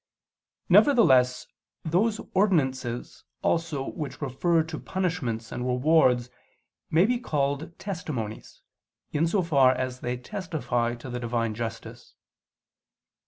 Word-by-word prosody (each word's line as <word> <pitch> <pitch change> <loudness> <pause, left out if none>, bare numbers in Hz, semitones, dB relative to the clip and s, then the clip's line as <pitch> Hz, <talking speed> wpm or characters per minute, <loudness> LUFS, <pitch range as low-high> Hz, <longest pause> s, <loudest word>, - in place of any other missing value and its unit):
Nevertheless 130 - +5 0.4
those 210 +7 +1
ordinances 130 - 0 0.2
also 160 -5 0
which 150 -5 -6
refer 160 +4 +1
to 160 -1 -6
punishments 160 - -3
and 125 - -4
rewards 125 -2 +3 0.6
may 165 +4 +4
be 245 +2 +1
called 145 - -2
"testimonies," 145 - -6 0.5
in 155 +3 +1
so 185 +2 +1
far 135 -6 +4
as 130 0 -3
they 125 0 -3
testify 130 - -2
to 120 - -10
the 125 - -3
Divine 115 -2 -1
justice. 115 0 -7
140 Hz, 110 wpm, -26 LUFS, 125-170 Hz, 0.6 s, Nevertheless